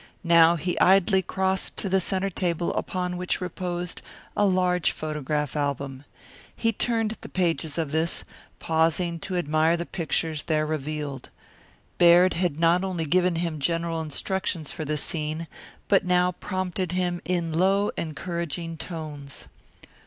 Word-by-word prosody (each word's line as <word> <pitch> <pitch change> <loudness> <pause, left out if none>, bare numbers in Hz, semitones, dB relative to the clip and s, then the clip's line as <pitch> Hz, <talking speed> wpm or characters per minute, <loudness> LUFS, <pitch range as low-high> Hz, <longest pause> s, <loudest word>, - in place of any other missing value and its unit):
Now 170 -1 +6
he 175 +2 -2
idly 190 +1 +5
crossed 190 +1 -1
to - - -2
the 190 0 +2
centre 190 +2 0
table 170 -2 -1
upon 180 -1 -2
which 180 0 -1
reposed 180 -1 -4 0.3
a 205 - +3
large 180 -2 +2
photograph 150 -1 -2
album. 140 -1 -2 0.5
He 230 - +1
turned 225 0 0
the - - -8
pages 165 -4 0
of 160 -4 -1
this, 160 +2 0 0.3
pausing 165 +1 +1
to 185 +2 -3
admire 160 +1 +2
the 170 - -3
pictures 160 -3 -2
there 155 -1 +1
revealed. 150 -3 -4 0.7
Baird 175 +1 +7
had 170 -3 -1
not 170 +2 +4
only 180 -4 -2
given 180 +2 +2
him 165 -2 -2
general 165 +2 0
instructions 160 +1 -2
for 155 - -5
this 150 0 -1
scene, 155 +1 -3 0.4
but 195 - +4
now 180 0 +3
prompted 185 0 -3
him 180 -1 -1
in 170 -3 -1
low, 195 +4 +3
encouraging 170 +1 -3
tones. 150 -5 -6
170 Hz, 140 wpm, -26 LUFS, 155-185 Hz, 0.7 s, Baird